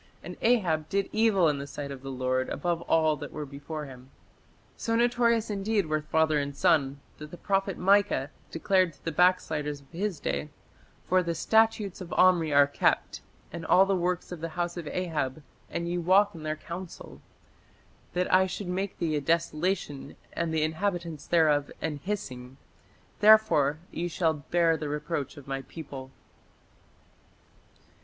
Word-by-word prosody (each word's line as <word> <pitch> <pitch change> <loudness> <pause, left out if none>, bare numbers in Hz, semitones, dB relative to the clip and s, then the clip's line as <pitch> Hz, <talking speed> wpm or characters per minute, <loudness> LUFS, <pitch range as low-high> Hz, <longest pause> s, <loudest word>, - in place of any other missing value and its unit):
And - - -7
Ahab... 175 -10 +2
did 200 0 0
evil 215 -5 +3
in 145 -2 0
the 140 - -6
sight 140 0 -6
of 135 -2 -8
the 135 - -7
Lord 130 0 -1
above 170 +3 -2
all 155 -1 +3
that - - -8
were 150 -1 -5
before 145 +2 -7
him." 130 -1 -12 0.7
So 230 - -2
notorious 235 -2 +2
indeed 205 0 0
were 155 0 -1
father 155 0 +2
and 140 0 -4
son 145 -6 +2 0.2
that 150 0 -8
the 175 - -10
prophet 195 +1 -1
Micah 195 -7 +2 0.2
declared 185 0 +1
to - - -26
the 165 - -1
backsliders 155 -4 +1
of 135 - -24
his 185 0 -3
day, 150 - -3 0.6
"For 185 0 +3
the 170 -1 -2
statutes 220 -2 +2
of 175 - -8
Omri 175 -4 +4
are 145 0 +6
kept, 140 - 0 0.3
and 170 - -6
all 185 +4 +5
the 195 0 +1
works 180 0 -2
of 175 -3 -7
the 165 - -3
house 175 0 -1
of 170 -3 -6
Ahab, 155 -6 -3 0.3
and 170 0 -3
ye 175 +1 -1
walk 190 +4 +4
in 165 - -10
their 155 0 -2
counsel; 160 - -9 0.9
that 180 0 0
I 190 0 +5
should 185 0 -5
make 190 +2 -3
thee 160 -3 -1
a 145 - 0
desolation, 165 -1 -1 0.2
and 165 -1 -2
the 160 -1 +1
inhabitants 165 -2 -2
thereof 150 -4 +3
an 155 -2 -3
hissing: 135 -8 -6 0.6
therefore 175 -10 +5
ye 175 - -3
shall 165 -1 +1
bear 165 +2 +1
the 150 -1 -4
reproach 150 0 -3
of 140 - -12
my 135 0 -3
people". 135 -2 -9
165 Hz, 165 wpm, -28 LUFS, 150-185 Hz, 0.9 s, are